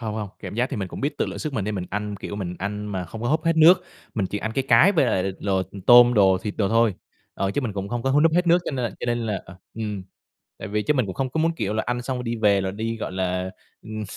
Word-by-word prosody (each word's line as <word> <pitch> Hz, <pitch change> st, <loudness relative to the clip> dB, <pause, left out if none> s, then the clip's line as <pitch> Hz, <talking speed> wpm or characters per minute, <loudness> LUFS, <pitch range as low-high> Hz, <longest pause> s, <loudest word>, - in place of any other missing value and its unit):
Hông, 110 Hz, -2 st, -4 dB
hông, 105 Hz, -2 st, -4 dB
cảm -, -, -7 dB
giác 120 Hz, +3 st, 0 dB
thì -, -, -3 dB
mình 95 Hz, -3 st, -3 dB
cũng -, -, -8 dB
biết 145 Hz, +2 st, -2 dB
tự -, -, +1 dB
lượng 95 Hz, +1 st, -6 dB
sức 150 Hz, +7 st, -4 dB
mình 105 Hz, -7 st, -2 dB
nên 105 Hz, -, -2 dB
mình 90 Hz, -2 st, -4 dB
ăn, 105 Hz, 0 st, -3 dB
kiểu, 100 Hz, -, -5 dB
mình 90 Hz, -3 st, -4 dB
ăn 105 Hz, +2 st, -4 dB
mà 95 Hz, -3 st, -3 dB
không 110 Hz, +7 st, -8 dB
có 120 Hz, -, -1 dB
húp 155 Hz, +3 st, +1 dB
hết 165 Hz, 0 st, +2 dB
nước, 175 Hz, +3 st, +7 dB, 0.3 s
mình 100 Hz, -5 st, 0 dB
chỉ 105 Hz, -, -4 dB
ăn 110 Hz, +2 st, -3 dB
cái 135 Hz, -, 0 dB
cái 145 Hz, -, +6 dB
với 170 Hz, -, +3 dB
lại 95 Hz, -, +1 dB
l 95 Hz, +1 st, -5 dB
đồ 95 Hz, -1 st, +2 dB, 0.2 s
tôm 120 Hz, 0 st, +8 dB
đồ, 95 Hz, -3 st, +5 dB
thịt 105 Hz, +2 st, -5 dB
đồ 100 Hz, -3 st, +1 dB
thôi, 115 Hz, -2 st, +3 dB, 0.4 s
ờ, 95 Hz, -, -1 dB
chứ 145 Hz, -, -1 dB
mình 120 Hz, -6 st, -3 dB
cũng 100 Hz, 0 st, -4 dB
không 120 Hz, +1 st, -3 dB
có 135 Hz, -, 0 dB
hút 145 Hz, +3 st, +4 dB
núp 165 Hz, -, +4 dB
hết 175 Hz, +2 st, +2 dB
nước, 175 Hz, +1 st, +5 dB
cho -, -, -2 dB
nên 130 Hz, -4 st, -2 dB
l -, -, 0 dB
cho -, -, -4 dB
nên 120 Hz, 0 st, 0 dB
là 110 Hz, -4 st, -2 dB
ờ, 85 Hz, -, -13 dB, 0.2 s
ừm, 105 Hz, -3 st, -4 dB, 0.6 s
tại -, -, -6 dB
vì 105 Hz, +1 st, -1 dB
chứ 150 Hz, +6 st, +1 dB
mình 130 Hz, -5 st, +1 dB
cũng 95 Hz, -, -5 dB
không 130 Hz, +5 st, -2 dB
có 160 Hz, -, -1 dB
muốn, 165 Hz, +1 st, +2 dB
kiểu 105 Hz, -4 st, -2 dB
là, 110 Hz, -, 0 dB
ăn 125 Hz, 0 st, -1 dB
xong 130 Hz, +1 st, -3 dB
rồi 125 Hz, -, -5 dB
đi 115 Hz, -1 st, -2 dB
về 105 Hz, -3 st, +3 dB
rồi 95 Hz, 0 st, -2 dB
đi, 115 Hz, +2 st, -3 dB
gọi 110 Hz, -, -5 dB
là, 95 Hz, 0 st, -2 dB, 0.3 s
ừm, 110 Hz, 0 st, -6 dB
110 Hz, 320 wpm, -24 LUFS, 100-125 Hz, 0.6 s, tôm